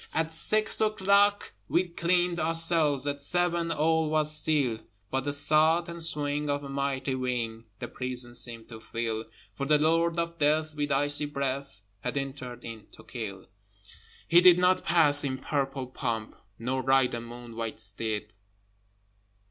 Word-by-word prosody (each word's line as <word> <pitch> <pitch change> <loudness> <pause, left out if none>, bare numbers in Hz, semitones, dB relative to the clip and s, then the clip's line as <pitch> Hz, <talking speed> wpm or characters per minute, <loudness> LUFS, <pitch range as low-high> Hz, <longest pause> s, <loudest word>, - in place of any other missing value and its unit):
At 160 0 0
six 215 +8 0
o'clock 205 -1 +3 0.2
we 180 +2 +2
cleaned 175 0 0
our 160 +1 0
cells, 160 -5 +2
At 145 0 -2
seven 175 +1 0
all 160 0 +1
was 155 0 +2
still, 145 -7 0 0.3
But 135 0 -1
the 145 - 0
sough 155 +4 +4
and 170 0 -5
swing 150 -2 +2
of 145 0 -1
a 140 - -7
mighty 135 -1 -2
wing 120 -3 -3
The 120 - -6
prison 125 -1 -4
seemed 115 -2 -4
to 115 -2 -9
fill, 115 0 -4 0.3
For 140 - -4
the 150 0 +5
Lord 165 +2 +2
of 170 0 -3
Death 155 +1 +1
with 145 -1 -2
icy 145 +1 +2
breath 140 -4 -4 0.2
Had 125 +6 -4
entered 130 -3 -6
in 115 -2 -9
to - - -14
kill. 100 -6 -7 0.8
He 170 +1 +6
did 180 -1 +8
not 180 +1 +3
pass 150 -4 +4
in 130 -2 -2
purple 135 -1 -2
pomp, 115 -3 -4 0.2
Nor 130 +3 -2
ride 130 0 +3
a 120 - -3
moon 120 0 -10
white 115 -1 -4
steed. 110 0 -3
145 Hz, 160 wpm, -28 LUFS, 125-165 Hz, 0.8 s, did